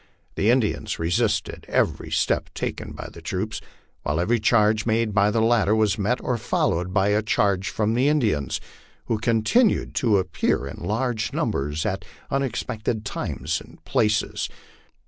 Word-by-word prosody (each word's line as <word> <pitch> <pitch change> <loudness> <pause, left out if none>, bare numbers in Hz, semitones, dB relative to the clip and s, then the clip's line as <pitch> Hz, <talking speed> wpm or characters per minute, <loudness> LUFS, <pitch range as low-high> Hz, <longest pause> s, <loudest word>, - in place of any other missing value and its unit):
The 105 - +1
Indians 120 -3 +1
resisted 85 +1 0
every - - 0
step - - 0
taken - - -4
by - - -7
the - - -11
troops, 105 +4 -3 0.4
while 75 +3 -1
every 115 +7 +2
charge 110 0 +3
made 110 -1 +1
by 100 0 +4
the 110 +1 +1
latter 115 -2 +3
was 110 -2 +2
met 115 +6 +1
or 125 -2 -1
followed 90 -3 0
by 100 +1 +2
a 105 +1 +3
charge 100 -3 +1
from 110 0 0
the 125 +4 +2
Indians, 110 - +1 0.5
who 110 - -1
continued 115 - +2
to 110 -6 +4
appear 90 -7 0
in 70 - -8
large 110 +3 -1
numbers 75 +3 -1
at - - -2 0.3
unexpected 115 -5 -2
times - - -3
and - - -15
places. 110 0 +1
110 Hz, 150 wpm, -24 LUFS, 100-115 Hz, 0.5 s, by